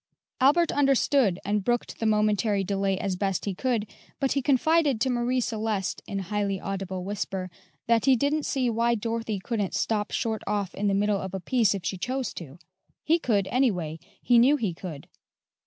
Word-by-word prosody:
Albert 295 Hz, +6 st, +4 dB
understood, 270 Hz, -7 st, +2 dB
and 205 Hz, 0 st, 0 dB
brooked 240 Hz, +3 st, -1 dB
the 225 Hz, -, 0 dB
momentary 210 Hz, -1 st, +2 dB
delay 195 Hz, 0 st, 0 dB
as 195 Hz, -1 st, -2 dB
best 195 Hz, -1 st, -1 dB
he 200 Hz, -, -1 dB
could, 235 Hz, +1 st, -1 dB, 0.3 s
but 270 Hz, -2 st, 0 dB
he 275 Hz, -, +1 dB
confided 285 Hz, 0 st, +2 dB
to 260 Hz, +3 st, +1 dB
Marie 245 Hz, +1 st, 0 dB
Celeste, 220 Hz, -4 st, -2 dB
in 200 Hz, -, -4 dB
highly 195 Hz, 0 st, -2 dB
audible 190 Hz, -1 st, -4 dB
whisper, 190 Hz, -2 st, -4 dB, 0.3 s
that 230 Hz, 0 st, +2 dB
he 270 Hz, -1 st, +6 dB
didn't 285 Hz, +4 st, 0 dB
see 260 Hz, -2 st, 0 dB
why 235 Hz, +1 st, +2 dB
Dorothy 225 Hz, -1 st, -2 dB
couldn't 200 Hz, 0 st, -2 dB
stop 210 Hz, -2 st, 0 dB
short 220 Hz, -2 st, -2 dB
off 205 Hz, -3 st, -1 dB
in 205 Hz, -, -1 dB
the 195 Hz, -, +2 dB
middle 205 Hz, 0 st, +1 dB
of 190 Hz, 0 st, -5 dB
a -, -, -3 dB
piece 210 Hz, +2 st, +2 dB
if 185 Hz, -2 st, -6 dB
she 190 Hz, -, -2 dB
chose 255 Hz, +6 st, -2 dB
to: 150 Hz, -3 st, -9 dB, 0.5 s
he 330 Hz, +2 st, +3 dB
could, 205 Hz, -, +1 dB
anyway 180 Hz, -, 0 dB, 0.2 s
he 240 Hz, -1 st, +5 dB
knew 270 Hz, +5 st, +5 dB
he 215 Hz, -9 st, -1 dB
could. 165 Hz, -4 st, -8 dB
210 Hz, 185 wpm, -26 LUFS, 195-250 Hz, 0.5 s, he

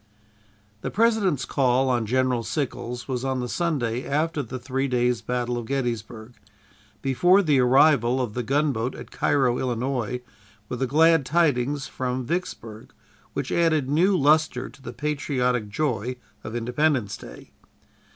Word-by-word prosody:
The -, -, -3 dB
President's 210 Hz, -, +2 dB
call 130 Hz, -1 st, +2 dB
on 120 Hz, -4 st, 0 dB
General 130 Hz, 0 st, +1 dB
Sickles 125 Hz, -1 st, -4 dB
was 130 Hz, -2 st, -3 dB
on 130 Hz, -1 st, -1 dB
the 125 Hz, -, -2 dB
Sunday 130 Hz, -6 st, -1 dB
after 155 Hz, +2 st, -1 dB
the 130 Hz, 0 st, -6 dB
three 130 Hz, +2 st, -2 dB
days' 125 Hz, -2 st, +1 dB
battle 125 Hz, -1 st, -2 dB
of 115 Hz, -, -7 dB
Gettysburg, 120 Hz, -3 st, -3 dB, 0.7 s
before 175 Hz, +9 st, +4 dB
the 150 Hz, -5 st, +3 dB
arrival 130 Hz, -1 st, +4 dB
of 120 Hz, -5 st, -2 dB
the 125 Hz, -, -2 dB
gunboat 135 Hz, -1 st, 0 dB
at -, -, -10 dB
Cairo, 125 Hz, -4 st, +1 dB
Illinois, 125 Hz, -1 st, -2 dB, 0.5 s
with 125 Hz, -, -4 dB
the 130 Hz, -, 0 dB
glad 160 Hz, +3 st, +4 dB
tidings 145 Hz, -2 st, +1 dB
from 125 Hz, 0 st, -3 dB
Vicksburg, 115 Hz, -9 st, -5 dB, 0.4 s
which -, -, -3 dB
added 155 Hz, -5 st, +2 dB
new 185 Hz, +6 st, +3 dB
luster 150 Hz, -3 st, +2 dB
to 135 Hz, -, -18 dB
the 130 Hz, -, -7 dB
patriotic 125 Hz, -4 st, -1 dB
joy 125 Hz, -1 st, -1 dB, 0.3 s
of 110 Hz, -, -6 dB
Independence 125 Hz, -2 st, 0 dB
Day. -, -, -12 dB
130 Hz, 140 wpm, -24 LUFS, 120-150 Hz, 0.7 s, before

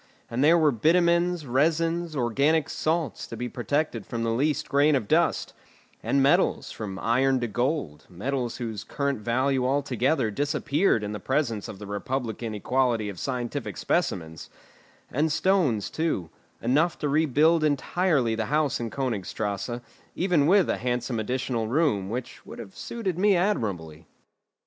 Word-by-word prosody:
And 120 Hz, +4 st, 0 dB
there 165 Hz, +3 st, +6 dB
were 155 Hz, -3 st, +4 dB
bitumens, 170 Hz, +5 st, +2 dB
resins, 165 Hz, +5 st, +1 dB
organic 140 Hz, +5 st, +1 dB
salts, 160 Hz, -1 st, -1 dB
to 115 Hz, -, -7 dB
be 125 Hz, +2 st, -3 dB
protected 125 Hz, -1 st, -2 dB
from 115 Hz, -1 st, -4 dB
the 115 Hz, -, 0 dB
least 145 Hz, +5 st, 0 dB
grain 145 Hz, +2 st, +3 dB
of 110 Hz, -6 st, -1 dB
dust; -, -, +1 dB, 0.5 s
and 140 Hz, -1 st, +2 dB
metals, 140 Hz, -, +2 dB
from 100 Hz, -3 st, -6 dB
iron 130 Hz, +5 st, +2 dB
to 120 Hz, -, 0 dB
gold, 120 Hz, -, -2 dB
metals 120 Hz, +6 st, -3 dB
whose 115 Hz, -4 st, -5 dB
current 140 Hz, -3 st, -2 dB
value 130 Hz, +4 st, +1 dB
altogether 130 Hz, -1 st, +1 dB
disappeared 145 Hz, -, +1 dB
in 105 Hz, -, -3 dB
the 105 Hz, -, -5 dB
presence 130 Hz, -7 st, -1 dB
of 100 Hz, -, -8 dB
the 105 Hz, -, -9 dB
republican 115 Hz, +1 st, -3 dB
equality 120 Hz, -1 st, 0 dB
of 95 Hz, -4 st, -8 dB
scientific 125 Hz, -3 st, -3 dB
specimens; 80 Hz, -2 st, -2 dB, 0.6 s
and 150 Hz, +4 st, +1 dB
stones 150 Hz, -, +1 dB
too, 155 Hz, -, -2 dB, 0.3 s
enough 150 Hz, +9 st, +2 dB
to 150 Hz, -, -2 dB
rebuild 155 Hz, +2 st, +3 dB
entirely 150 Hz, -3 st, +1 dB
the 110 Hz, 0 st, -1 dB
house 150 Hz, 0 st, +1 dB
in 115 Hz, -1 st, -3 dB
Königstrasse, 110 Hz, -2 st, -3 dB, 0.3 s
even 175 Hz, -6 st, +2 dB
with 190 Hz, -1 st, +5 dB
a -, -, 0 dB
handsome 120 Hz, -1 st, -2 dB
additional 120 Hz, 0 st, -2 dB
room, 120 Hz, -, +1 dB
which 120 Hz, +3 st, -6 dB
would -, -, -10 dB
have 110 Hz, -5 st, -10 dB
suited 195 Hz, -7 st, -4 dB
me 205 Hz, 0 st, +4 dB
admirably. 95 Hz, -, -2 dB
130 Hz, 150 wpm, -26 LUFS, 115-155 Hz, 0.6 s, there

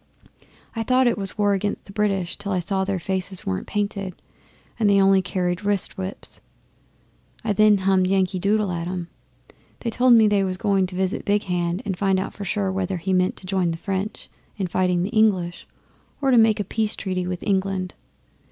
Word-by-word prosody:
I 225 Hz, -, -1 dB
thought 255 Hz, +3 st, +3 dB
it 240 Hz, -, +3 dB
was 195 Hz, -1 st, -4 dB
war 205 Hz, -1 st, +3 dB
against 200 Hz, +1 st, -2 dB
the -, -, -12 dB
British 195 Hz, -4 st, 0 dB
till 205 Hz, 0 st, -5 dB
I 185 Hz, -, +1 dB
saw 190 Hz, +2 st, -1 dB
their 195 Hz, 0 st, -1 dB
faces 190 Hz, +1 st, -3 dB
weren't 95 Hz, -1 st, -3 dB
painted, 200 Hz, -3 st, -3 dB, 0.6 s
and 215 Hz, -2 st, +3 dB
they 200 Hz, 0 st, +5 dB
only 195 Hz, 0 st, +5 dB
carried 180 Hz, 0 st, -2 dB
wrist 200 Hz, -2 st, 0 dB
whips. 190 Hz, +1 st, -6 dB, 1.0 s
Then 215 Hz, 0 st, +4 dB
I -, -, -6 dB
hummed 190 Hz, -1 st, +3 dB
"Yankee 190 Hz, -1 st, +1 dB
Doodle" 205 Hz, +1 st, +1 dB
at 170 Hz, -1 st, -3 dB
'em. 180 Hz, -1 st, -4 dB, 0.7 s
They 230 Hz, -, -2 dB
told 250 Hz, +1 st, +5 dB
me 225 Hz, -2 st, +7 dB
they 205 Hz, -1 st, +3 dB
was 185 Hz, -1 st, -2 dB
going 195 Hz, -2 st, +1 dB
to 180 Hz, -, -8 dB
visit 190 Hz, +2 st, -1 dB
Big 205 Hz, 0 st, +1 dB
Hand 175 Hz, +2 st, -1 dB
and 195 Hz, -3 st, -2 dB
find 190 Hz, 0 st, +1 dB
out 190 Hz, -, -4 dB
for 200 Hz, -, -7 dB
sure 195 Hz, 0 st, -1 dB
whether 190 Hz, -1 st, -2 dB
he 190 Hz, +3 st, -2 dB
meant 185 Hz, 0 st, +2 dB
to -, -, -11 dB
join 185 Hz, -2 st, 0 dB
the 165 Hz, -, -3 dB
French 195 Hz, +3 st, -4 dB, 0.3 s
in 195 Hz, -, -1 dB
fighting 180 Hz, 0 st, +1 dB
the 190 Hz, -, -2 dB
English 195 Hz, -6 st, +1 dB, 0.5 s
or 275 Hz, -2 st, +2 dB
make 225 Hz, -3 st, +5 dB
a -, -, +1 dB
peace 215 Hz, +2 st, -1 dB
treaty 185 Hz, -2 st, -3 dB
with 180 Hz, -1 st, -4 dB
England. 190 Hz, -2 st, -1 dB
195 Hz, 200 wpm, -23 LUFS, 185-205 Hz, 1.0 s, me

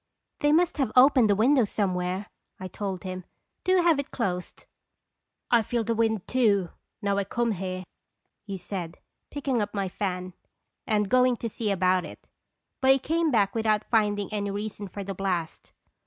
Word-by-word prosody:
" -, -, -56 dB
They 295 Hz, -, +3 dB
must 335 Hz, +2 st, +3 dB
have 265 Hz, -6 st, +1 dB
opened 255 Hz, -3 st, +6 dB
a 205 Hz, -, +4 dB
window 250 Hz, +5 st, +4 dB
some 200 Hz, -2 st, 0 dB
where/' 180 Hz, +2 st, -2 dB, 0.3 s
I 185 Hz, -, -5 dB
told 190 Hz, 0 st, -5 dB
him. 185 Hz, -1 st, -5 dB, 0.2 s
" -, -, -54 dB
Do 370 Hz, -1 st, +4 dB
have 330 Hz, -4 st, +4 dB
it 280 Hz, -, -4 dB
closed." 180 Hz, -7 st, -4 dB, 0.4 s
" -, -, -33 dB
I 235 Hz, -1 st, +6 dB
feel 230 Hz, +2 st, -1 dB
the 230 Hz, +1 st, 0 dB
wind, 220 Hz, -3 st, 0 dB
too, 205 Hz, -8 st, +2 dB, 0.3 s
now 200 Hz, 0 st, +1 dB
I -, -, +1 dB
come 235 Hz, +4 st, -1 dB
here," 185 Hz, -1 st, -4 dB, 0.6 s
he 200 Hz, -2 st, -5 dB
said, 180 Hz, -2 st, -6 dB, 0.3 s
picking 270 Hz, -5 st, -1 dB
up 205 Hz, 0 st, -4 dB
my 195 Hz, -1 st, -1 dB
fan, 185 Hz, -1 st, -4 dB, 0.5 s
and 210 Hz, -2 st, +1 dB
going 250 Hz, +2 st, +3 dB
to 230 Hz, -, -4 dB
see 220 Hz, 0 st, -3 dB
about 185 Hz, -1 st, +2 dB
it, -, -, -11 dB, 0.5 s
but 265 Hz, 0 st, +6 dB
he -, -, +2 dB
came 325 Hz, +4 st, 0 dB
back 205 Hz, -7 st, +2 dB
without 220 Hz, -2 st, 0 dB
finding 210 Hz, -2 st, +1 dB
any 205 Hz, -1 st, -1 dB
reason 205 Hz, 0 st, -5 dB
for 200 Hz, +2 st, -7 dB
the 195 Hz, 0 st, -5 dB
blast. 180 Hz, -4 st, -3 dB
210 Hz, 185 wpm, -27 LUFS, 190-240 Hz, 0.6 s, opened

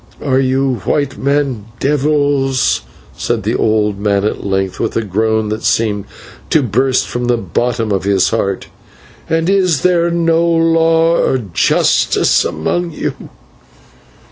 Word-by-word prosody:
"Are 130 Hz, -2 st, +2 dB
you 130 Hz, -1 st, +1 dB
white 145 Hz, -2 st, -1 dB
men 140 Hz, +1 st, +1 dB
then 135 Hz, -8 st, -2 dB, 0.3 s
devils?" 140 Hz, -4 st, +1 dB, 0.3 s
said -, -, -2 dB
the -, -, -1 dB
old 105 Hz, -2 st, 0 dB
man 100 Hz, -1 st, 0 dB
at 105 Hz, -, -2 dB
length, 95 Hz, -1 st, -2 dB
with 115 Hz, -, -2 dB
a 115 Hz, -, 0 dB
groan 110 Hz, +2 st, 0 dB
that 110 Hz, +1 st, -3 dB
seemed 105 Hz, -3 st, 0 dB, 0.4 s
to 155 Hz, -, +3 dB
burst 130 Hz, +3 st, +1 dB
from 120 Hz, 0 st, -3 dB
the 120 Hz, 0 st, +1 dB
bottom 115 Hz, +3 st, -2 dB
of 95 Hz, -2 st, 0 dB
his 100 Hz, -2 st, +2 dB
heart, 100 Hz, -4 st, -1 dB, 0.6 s
"and 165 Hz, 0 st, 0 dB
is 185 Hz, -7 st, +2 dB
there 170 Hz, -2 st, +2 dB
no 165 Hz, -1 st, +1 dB
law 165 Hz, 0 st, +3 dB
or 130 Hz, -, +1 dB
justice 100 Hz, -9 st, +2 dB
among 175 Hz, -, -2 dB
you?" -, -, -3 dB
130 Hz, 140 wpm, -15 LUFS, 105-160 Hz, 0.6 s, to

